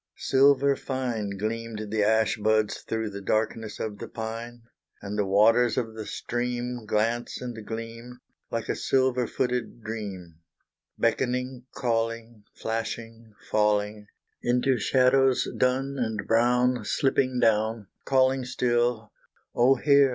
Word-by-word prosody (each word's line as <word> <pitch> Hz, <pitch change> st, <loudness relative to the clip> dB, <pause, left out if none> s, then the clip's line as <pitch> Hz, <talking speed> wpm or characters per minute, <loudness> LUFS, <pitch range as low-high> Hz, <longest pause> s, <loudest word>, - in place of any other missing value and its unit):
Silver 140 Hz, +1 st, +4 dB
fine 120 Hz, -8 st, -3 dB
Gleamed 110 Hz, 0 st, -4 dB
the 110 Hz, -1 st, +1 dB
ash 110 Hz, +3 st, +3 dB
buds 110 Hz, 0 st, +1 dB
through 110 Hz, -1 st, -3 dB
the 100 Hz, 0 st, -7 dB
darkness 110 Hz, +1 st, -1 dB
of 105 Hz, -2 st, -4 dB
the -, -, -6 dB
pine, 115 Hz, +1 st, -6 dB, 0.4 s
And 100 Hz, +1 st, -6 dB
the 105 Hz, -2 st, 0 dB
waters 115 Hz, +5 st, +4 dB
of 115 Hz, -3 st, -1 dB
the 110 Hz, -1 st, -7 dB
stream 120 Hz, -1 st, -3 dB
Glance 115 Hz, +3 st, 0 dB
and 120 Hz, -3 st, -6 dB
gleam, 115 Hz, +2 st, -7 dB, 0.3 s
Like 115 Hz, -1 st, -3 dB
a -, -, -1 dB
silver 130 Hz, -2 st, +1 dB
footed 125 Hz, -2 st, -2 dB
dream 95 Hz, -7 st, -6 dB, 0.6 s
Beckoning, 125 Hz, +1 st, -1 dB
calling, 115 Hz, -2 st, -2 dB
Flashing, 115 Hz, 0 st, -5 dB, 0.2 s
falling, 105 Hz, 0 st, +1 dB, 0.3 s
Into 125 Hz, +1 st, +2 dB
shadows 130 Hz, +2 st, +3 dB
dun 135 Hz, +2 st, 0 dB
and 110 Hz, -3 st, -2 dB
brown 125 Hz, +2 st, +2 dB
Slipping 130 Hz, -3 st, +1 dB
down, 110 Hz, -1 st, +2 dB, 0.2 s
Calling 130 Hz, 0 st, +2 dB
still 120 Hz, -3 st, 0 dB, 0.4 s
Oh 125 Hz, +3 st, +5 dB
hear! 140 Hz, +1 st, +5 dB
115 Hz, 120 wpm, -26 LUFS, 110-125 Hz, 0.6 s, Oh